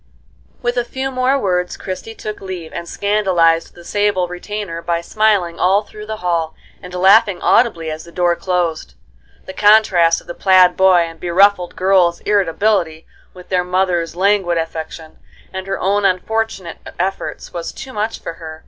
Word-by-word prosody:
With 240 +1 -1
a 245 - +2
few 265 +2 -4
more 255 +1 +1
words 180 -6 -1
Christie 195 +4 -7
took 215 -1 -7
leave, 185 -4 -7
and 170 - -6
scandalized 185 -5 +1
the 175 - -13
sable 205 -3 0
retainer 180 -1 -6
by 170 0 -1
smiling 190 -2 0
all 195 +3 +3
through 210 0 -11
the 220 - -4
hall, 165 -2 -1 0.3
and 180 - -10
laughing 190 +1 +4
audibly 170 -10 +2
as 155 +1 -6
the 170 - -14
door 175 0 +1
closed. 170 - -2 0.5
The 190 - -8
contrast 195 -6 +4
of - - -19
the - - -7
plaid 185 -2 +4
boy 190 -2 +5
and 165 -1 -5
beruffled 180 +1 +2
girl's 185 -2 +2
irritability 190 -4 0 0.3
with 180 -1 -13
their 180 -1 +1
mother's 180 -2 -1
languid 190 -2 +1
affectation, 160 -1 -6 0.3
and 190 0 -6
her 195 - -3
own 200 +2 +1
unfortunate 195 -1 -1 0.2
efforts, 190 +2 -4
was 170 -1 -5
too 260 - -10
much 215 +2 -2
for - - -6
her. 160 -1 -8
185 Hz, 165 wpm, -18 LUFS, 170-205 Hz, 0.5 s, boy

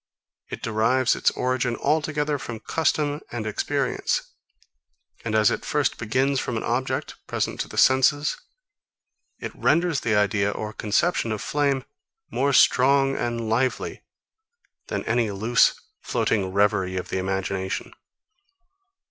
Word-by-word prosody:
It - - -7
derives 115 +3 +2
its - - +2
origin 125 -1 -1
altogether 150 0 0
from 120 -4 -6
custom 150 +2 0
and 120 -2 -4
experience. 110 - -1 1.0
And 110 -1 -2
as 110 -2 +4
it - - -3
first - - 0
begins 130 +5 +1
from 120 - -3
an - - -3
object, 125 +3 -2
present - - -2
to - - -2
the - - -10
senses, 140 +3 +4 1.0
it - - -6
renders 170 -4 +2
the 110 -2 0
idea 100 0 +2
or 105 +1 -5
conception 115 - 0
of 110 - -2
flame 140 -1 0 0.5
more 140 +1 +1
strong 135 +1 +4
and 115 -1 -2
lively 125 +4 -1 0.9
than - - -3
any 115 -1 +1
loose, 110 +4 +2 0.2
floating 95 -3 0
reverie 95 -2 +1
of 90 - -4
the 95 - -1
imagination. 95 0 -3
120 Hz, 130 wpm, -24 LUFS, 105-135 Hz, 1.0 s, as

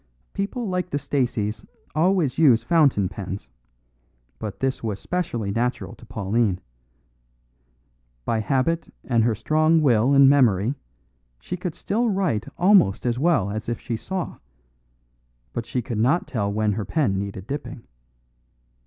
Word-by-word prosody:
"People 210 +4 -3
like 180 -1 -2
the 145 - -1
Staceys 125 -7 -1 0.3
always 160 -4 +2
use 130 -8 +5
fountain 145 - +3
pens; 95 -5 -7 0.9
but 105 - -6
this 135 -1 -1
was 105 -3 -3
specially 135 - -2
natural 120 +4 -2
to 120 - -15
Pauline. 105 -2 0 1.7
By 115 - 0
habit 135 +8 0
and 115 -3 +2
her 115 -1 +2
strong 155 +8 +3
will 130 -2 +3
and 135 0 +8
memory 125 -5 +4 0.7
she - - -5
could 180 -2 -5
still 230 +3 0
write 185 - 0
almost 180 - +4
as 120 0 0
well 145 - +2
as 110 +2 -4
if 120 - -2
she 120 - -4
saw; 185 +9 -5 1.1
but 115 -2 -4
she 125 - -2
could 115 -3 -3
not 135 +10 +2
tell 100 -5 -2
when 105 0 +1
her 105 +1 -2
pen 125 -12 0
needed 95 -1 -5
dipping. 135 -2 -6
125 Hz, 140 wpm, -24 LUFS, 110-160 Hz, 1.7 s, and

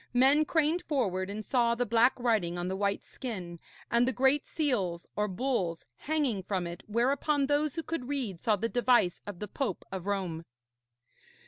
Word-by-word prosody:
Men 275 +5 +5
craned 320 +2 +2
forward 195 - -1
and 210 +1 -5
saw 235 -2 +2
the 245 +1 0
black 235 +4 +3
writing 215 -8 +1
on 175 0 -2
the 190 - -2
white 200 0 -1
skin, 180 -9 -6 0.3
and 235 +1 +4
the - - +2
great 270 +3 +2
seals, 200 - -1
or 210 0 +1
bulls, 190 -5 -1
hanging 285 - -1
from 185 -1 -2
it 170 0 -6
whereon 275 +6 +1
those 290 0 +1
who 330 - -3
could 310 -6 -4
read 245 -11 -2
saw 215 +3 +2
the 225 +3 -1
device 240 -6 +2
of 205 -3 -6
the 210 - -5
Pope 215 -2 -3
of 190 0 -5
Rome. 185 -5 -2
235 Hz, 180 wpm, -30 LUFS, 190-270 Hz, 0.3 s, Men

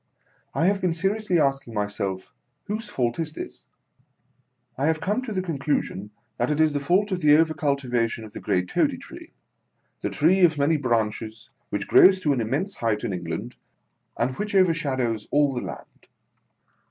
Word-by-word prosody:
I 165 - +2
have 200 +1 +2
been 180 -3 +1
seriously 195 +1 0
asking 135 -5 0
myself, 100 -2 -3 0.3
whose 215 +1 -4
fault 120 -4 -1
is 160 -2 -2
this - - -9 1.1
1 135 - -2
I - - +3
have 160 0 +1
come 205 +9 -1
to 255 -3 -6
the 185 -3 -1
conclusion 140 - -2 0.3
that 120 - 0
it 150 0 0
is 155 -1 +4
the 145 - 0
fault 185 +8 +1
of 185 -1 -1
the 150 -1 +6
over 160 0 +3
cultivation 125 -7 -1
of 105 - -13
the - - -6
great 90 0 0
Toady - - +1
Tree; - - -10 0.7
the - - -2
tree 175 +6 +3
of 170 -4 +4
many 145 +3 +3
branches, 110 -4 -2 0.2
which 100 -1 -3
grows 190 0 +7
to 150 -5 +2
an 125 - -1
immense 145 - -1
height 110 -3 -1
in 105 - -2
England, 90 +7 -5 0.6
and 130 - +1
which 210 -1 -3
overshadows 135 - +1
all 145 -1 +3
the 120 - -3
land. 90 -4 -10
145 Hz, 180 wpm, -25 LUFS, 115-175 Hz, 1.1 s, grows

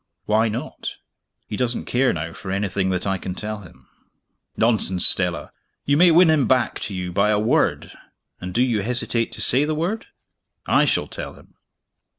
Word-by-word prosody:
"Why 110 +1 +2
not?" 110 +3 -6 0.5
"He - - -5
doesn't 125 +1 -1
care, 125 +1 +1
now, 85 0 -5
for 95 - -9
anything 95 0 -1
that 90 -1 -2
I 95 -1 -1
can 90 0 -6
tell 105 +1 -5
him." 90 -4 -16 0.7
"Nonsense, 105 -6 +3
Stella! 90 -2 +2 0.3
You 140 - +2
may 175 +4 +6
win 170 0 +5
him 145 -6 +2
back 125 0 +1
to 100 - -7
you 90 -1 -4
by 100 +3 +1
a 105 - +2
word 110 +2 0 0.5
and 90 0 -6
do 120 +7 +2
you 115 -5 0
hesitate 115 +1 -1
to - - -5
say 130 +4 +5
the 155 +1 -1
word? 180 +8 -3 0.6
I - - +3
shall - - 0
tell - - -8
him!" - - -20
110 Hz, 180 wpm, -22 LUFS, 95-130 Hz, 0.7 s, may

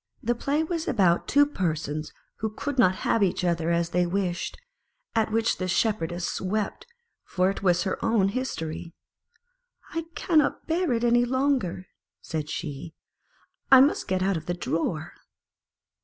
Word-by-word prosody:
The 240 - +2
play 280 +6 0
was 330 +1 -3
about 185 - +2
two 290 0 +5
persons 155 - -3 0.3
who 220 - -2
could 265 +5 -4
not 185 -4 +5
have 230 - +2
each 190 -2 +1
other 170 -1 0
as 170 0 +1
they 180 0 +2
wished, 180 -1 -2 0.6
at 220 -1 +1
which 225 +1 +1
the 185 - -1
Shepherdess 175 -3 -1
wept, 205 - -2 0.4
for 185 +1 +1
it 195 - -7
was 180 -2 +3
her 190 - -3
own 225 -4 +3
history. 170 -9 -4 1.0
"I 330 -1 -2
cannot 315 -4 +2
bear 340 -1 0
it 230 0 -1
any 240 0 +4
longer," 255 -8 0 0.3
said 155 -2 -4
she; 155 0 -5 0.4
" - - -39
I 265 - +10
must 275 +3 +3
get 185 0 0
out 195 -2 +1
of 160 - -8
the 175 - -1
drawer." 165 -1 -2
190 Hz, 155 wpm, -26 LUFS, 170-245 Hz, 1.0 s, I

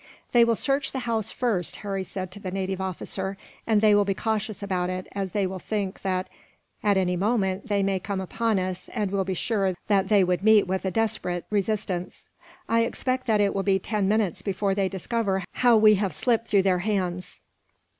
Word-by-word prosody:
"They 240 -1 +6
will 230 0 +3
search 275 +4 0
the 265 - -2
house, 225 -3 -1
first," 215 -9 -1
Harry 195 -2 -3
said 185 -1 -6
to 205 - -10
the 190 - -5
native 190 0 -3
officer, 190 +1 -3 0.3
"and 215 -2 +3
they 215 -1 +5
will 205 0 +5
be 195 -1 -1
cautious 215 -1 -2
about 180 -2 -1
it, 185 0 -4
as 195 -2 -3
they 205 -2 +1
will 190 0 -4
think 200 -1 -3
that 185 -1 -1 0.5
at 205 -2 +3
any 180 -1 +1
moment 195 0 0
they 200 -2 +1
may 195 -1 +1
come 195 +1 -3
upon 225 +3 0
us, 185 -1 -3
and 210 -5 -1
will 200 -1 +1
be 190 0 -2
sure 195 -3 0
that 195 -1 +2
they 205 -3 +5
would 180 0 0
meet 215 0 +5
with 190 +1 -2
a - - +1
desperate 185 -5 -1
resistance. 200 -3 -2 0.4
I 230 - +2
expect 255 +2 -1
that 215 -2 +3
it 200 -1 +2
will 195 - 0
be 195 -1 +2
ten 200 +1 -1
minutes 205 -4 +1
before 195 0 -1
they 195 -1 0
discover 195 0 -1
how 240 -2 +4
we 215 0 +7
have 190 -7 -1
slipped 230 +6 +1
through 200 -2 +3
their 185 -2 +2
hands." 180 -3 -2
195 Hz, 205 wpm, -26 LUFS, 190-215 Hz, 0.5 s, we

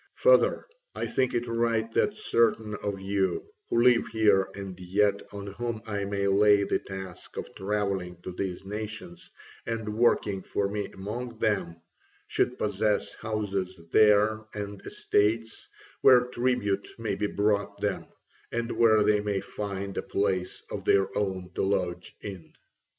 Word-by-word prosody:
Further, - - +4 0.3
I - - -2
think 130 -1 0
it 120 0 0
right 115 -1 0
that 210 - +1
certain 115 - +1
of 100 -1 -3
you 95 0 0 0.2
who 120 - +3
live 125 -2 +5
here 105 -4 +3
and 95 -2 -6
yet 100 +2 +1
on 100 -1 -7
whom 110 +3 -4
I 105 -2 -2
may 100 0 -1
lay 100 +1 +5
the - - 0
task 95 -2 -8
of - - -6
travelling 95 -3 -2
to 95 - -5
these 95 0 -4
nations 110 - -7 0.3
and 110 -2 -3
working 105 -4 +2
for 100 +2 -1
me 105 +1 -3
among 115 +5 -6
them, 100 -7 -1 0.4
should 125 - 0
possess 105 0 0
houses 100 -4 -3
there 110 +1 +5
and 100 -1 -5
estates, 115 +2 0 0.3
where 125 -2 +8
tribute 125 -5 -1
may 115 -2 -2
be 105 - -1
brought 100 0 0
them, - - -2 0.4
and 120 0 -2
where 110 -2 +5
they 105 0 +4
may 105 -1 -1
find 100 -1 -5
a - - -1
place 95 -2 -1
of - - -4
their 95 -1 +2
own 95 -3 -2
to - - -2
lodge 90 -3 -1
in." 95 -5 -8
105 Hz, 150 wpm, -28 LUFS, 95-115 Hz, 0.4 s, where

